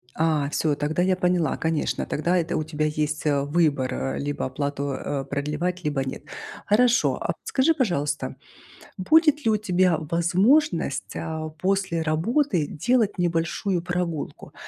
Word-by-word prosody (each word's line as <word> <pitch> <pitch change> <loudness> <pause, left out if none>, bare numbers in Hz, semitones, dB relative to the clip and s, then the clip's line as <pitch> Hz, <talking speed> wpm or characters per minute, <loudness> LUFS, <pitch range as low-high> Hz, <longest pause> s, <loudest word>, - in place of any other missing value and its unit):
А, 155 -3 +1
всё, 150 -1 0
тогда 155 +4 -1
я 185 0 +2
поняла, 180 -4 +1
конечно, 160 -1 -1
тогда 170 +4 0
это 170 0 -1
у 155 - -1
тебя 155 -1 -2
есть 150 0 -1
выбор, 145 -2 +1
а, 135 - -2
либо 145 0 -3
оплату, 140 +1 -3
а, 135 +1 -3
продлевать, 150 +6 -3
либо 145 -3 0
нет. 130 - -6 0.4
Хорошо, 240 +3 +3
а - - -2
вот - - -1
скажи, 285 +5 +2
пожалуйста, 165 - -1 0.6
будет 300 - +4
ли 220 - +4
у 215 - +3
тебя 185 -4 +2
возможность, 170 - +1
а, 160 -1 -4
после 185 +1 -1
работы 175 - +1
делать 220 +5 +1
небольшую 175 +1 0
прогулку? 175 -3 -4
165 Hz, 145 wpm, -24 LUFS, 150-185 Hz, 0.6 s, будет